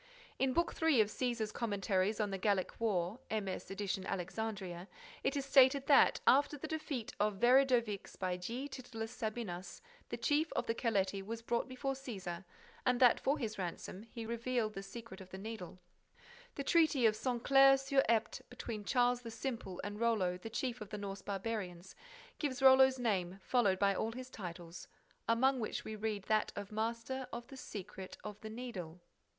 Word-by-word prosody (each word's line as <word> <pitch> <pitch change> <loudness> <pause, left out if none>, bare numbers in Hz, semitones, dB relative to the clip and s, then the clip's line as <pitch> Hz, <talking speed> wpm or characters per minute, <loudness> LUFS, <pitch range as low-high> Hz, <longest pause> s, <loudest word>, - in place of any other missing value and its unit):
In 265 -1 +3
Book 340 +5 +1
III 320 -6 +5
of 210 - +1
Cæsar's 235 -3 -1
Commentaries 205 -2 0
on 210 -2 0
the 195 - -3
Gallic 195 -2 0
War 195 -1 0
(MS. 205 -4 -3
edition, 195 -1 -2
Alexandria), 190 -1 -4 0.4
it - - +1
is 275 - -2
stated 270 0 +6
that, 285 - +6
after 290 +2 +4
the 315 - -5
defeat 305 -7 -4
of 210 0 +2
Veridovix 240 -3 +3
by 185 -1 -1
G. 235 +10 -4
Titullius 245 -4 -6
Sabinus, 215 -6 -4 0.3
the - - -3
chief 305 +2 +1
of - - -1
the 230 - 0
Caleti 200 -4 0
was 230 +3 -6
brought 235 +1 0
before 270 +1 -2
Cæsar 195 -10 -6 0.4
and 250 -1 +2
that, 250 -2 +6
for 280 +3 +1
his 215 -4 -4
ransom, 185 +1 -5
he 230 +1 -8
revealed 235 -1 -1
the 195 - -5
secret 215 -1 -9
of 185 - -11
the 190 - -7
Needle— 200 -3 -7 0.8
The 280 - -3
Treaty 310 -4 +4
of 215 -1 +5
Saint 240 +1 -2
Clair 270 0 +7
sur 270 0 +2
Epte, 225 -1 +1
between 230 -3 -6
Charles 245 +1 +2
the 235 - -7
Simple 225 -5 -4
and 205 +1 -5
Rollo, 215 -6 +2
the 180 +5 -7
chief 245 +1 -3
of 210 - -7
the 210 - -5
Norse 200 -1 -5
barbarians, 195 -3 -4 0.5
gives 275 -3 -2
Rollo's 265 0 +7
name 195 -6 -1
followed 220 -7 +3
by 200 0 +3
all 225 +3 -2
his 255 +1 -8
titles, 175 -4 -8 0.4
among 260 +3 +4
which 220 - -3
we 220 - -5
read 210 -2 -2
that 215 +1 +1
of 205 0 -6
Master 230 +4 -2
of 235 0 -5
the 270 - -10
Secret 195 -5 -8
of 210 -1 -7
the 220 - -6
Needle. 210 -8 -6
225 Hz, 180 wpm, -35 LUFS, 195-255 Hz, 0.8 s, Clair